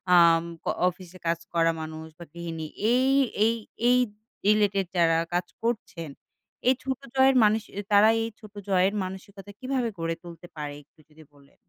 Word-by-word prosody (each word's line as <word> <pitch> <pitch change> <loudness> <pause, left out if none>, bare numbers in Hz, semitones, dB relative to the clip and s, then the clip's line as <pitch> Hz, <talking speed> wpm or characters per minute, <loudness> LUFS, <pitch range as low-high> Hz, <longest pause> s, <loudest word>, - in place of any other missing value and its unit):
আম 165 -1 +6 0.2
অ - - +2 0.2
অফিসে 180 0 -12
কাজ 165 0 +1
করা 165 0 +3
মানুষ 160 0 -7
বা 170 - -9
গৃহিনী 165 -2 -6 0.3
এই, 260 +2 +3 0.4
এই, 230 - +3 0.3
এই, 250 0 +5 0.5
রিলেটেড 205 -2 +3
যারা 165 -1 +4 0.2
কাজ 175 0 +1 0.2
করছেন। 210 -9 -3 0.6
এই 260 - +6
ছোট 265 0 -2 0.2
জয়ের 265 0 +5
মানুষ 215 +1 +4 0.3
তারা 205 +2 +7
এই 225 - -3
ছোট 215 -1 -14 0.2
জয়ের 190 +1 +3
মানসিকতা 195 +2 -9
কিভাবে 255 -2 -1
গড়ে 165 0 -1
তুলতে 175 0 -11
পারে 150 -2 -5
একটু 150 - -35
যদি 155 +1 -17
বলে 140 -1 -22
185 Hz, 160 wpm, -26 LUFS, 165-215 Hz, 0.6 s, তারা